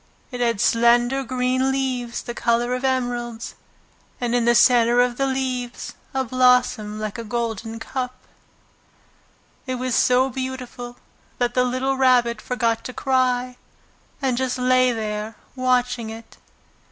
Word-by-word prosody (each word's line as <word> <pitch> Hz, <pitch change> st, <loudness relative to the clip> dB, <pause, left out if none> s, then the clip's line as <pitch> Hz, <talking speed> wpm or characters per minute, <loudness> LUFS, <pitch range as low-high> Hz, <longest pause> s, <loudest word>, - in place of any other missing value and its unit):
It 250 Hz, -, -6 dB
had 235 Hz, -4 st, +1 dB
slender 240 Hz, +4 st, +3 dB
green 255 Hz, +1 st, 0 dB
leaves 255 Hz, -3 st, -2 dB
the 240 Hz, -, -5 dB
colour 235 Hz, +1 st, +1 dB
of 255 Hz, +1 st, -3 dB
emeralds, 245 Hz, -3 st, -2 dB, 0.7 s
and 240 Hz, -1 st, -1 dB
in 240 Hz, -1 st, +2 dB
the 240 Hz, 0 st, +4 dB
centre 240 Hz, 0 st, +5 dB
of 245 Hz, -1 st, +2 dB
the 275 Hz, -, +1 dB
leaves 255 Hz, -2 st, -3 dB, 0.2 s
a 265 Hz, -1 st, 0 dB
blossom 250 Hz, -4 st, +2 dB
like 215 Hz, +1 st, -4 dB
a -, -, -4 dB
golden 225 Hz, -1 st, -3 dB
cup. 255 Hz, +2 st, -4 dB, 1.5 s
It 255 Hz, -, -1 dB
was 255 Hz, 0 st, -2 dB
so 250 Hz, +2 st, +4 dB
beautiful 250 Hz, -1 st, -6 dB, 0.4 s
that 245 Hz, -1 st, 0 dB
the 250 Hz, -, +3 dB
little 255 Hz, +2 st, -1 dB
Rabbit 245 Hz, -4 st, +3 dB
forgot 230 Hz, -2 st, -1 dB
to 255 Hz, -, -6 dB
cry, 255 Hz, -1 st, 0 dB, 0.7 s
and 255 Hz, -2 st, +1 dB
just 260 Hz, -1 st, -1 dB
lay 255 Hz, 0 st, +3 dB
there 215 Hz, -1 st, -4 dB, 0.2 s
watching 250 Hz, -2 st, 0 dB
it. 225 Hz, +1 st, -11 dB
245 Hz, 140 wpm, -22 LUFS, 235-255 Hz, 1.5 s, centre